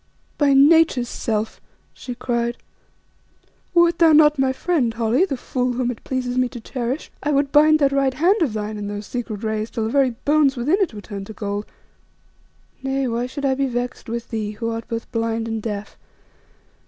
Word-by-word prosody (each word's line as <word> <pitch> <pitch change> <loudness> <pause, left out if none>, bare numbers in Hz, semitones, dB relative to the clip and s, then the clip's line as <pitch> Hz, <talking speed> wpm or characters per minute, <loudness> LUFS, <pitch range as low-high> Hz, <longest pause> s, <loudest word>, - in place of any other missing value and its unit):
"By 285 -2 +4
Nature's 285 -4 +5
self!" 220 -1 -3 0.3
she 250 - -7
cried; 235 -1 -2 1.2
"wert 345 0 +4
thou 330 -2 +6
not 300 -1 +5
my 265 0 +3
friend, 265 -3 0
Holly, 230 +8 +2
the 275 -9 -3
fool 250 0 -2
whom 245 0 -1
it 235 - -10
pleases 255 -1 -2
me 250 -1 +2
to 245 - -8
cherish, 250 +4 -4
I 295 - -2
would 280 -1 +1
bind 310 +1 +6
that 280 -2 +2
right 275 -1 +1
hand 355 +8 +3
of 280 -9 +1
thine 215 0 -4
in 205 - -4
those 205 0 -5
secret 225 -2 -5
rays 220 0 -2
till 225 - -3
the 220 - -2
very 275 -1 +3 0.2
bones 290 -2 +3
within 300 - +1
it 335 - 0
were 205 - -7
turned 200 -2 -7
to 220 - -8
gold. 205 0 -4 1.1
Nay, 270 0 -1
why 240 +1 -1
should 280 +2 -5
I 270 - +3
be 275 +1 0
vexed 245 -1 -4
with 235 0 -4
thee, 215 -2 -3
who 230 +2 -3
art 225 0 -5
both 230 0 -5
blind 225 0 -1
and 225 -1 -3
deaf? 210 -1 -6
245 Hz, 195 wpm, -21 LUFS, 225-275 Hz, 1.2 s, thou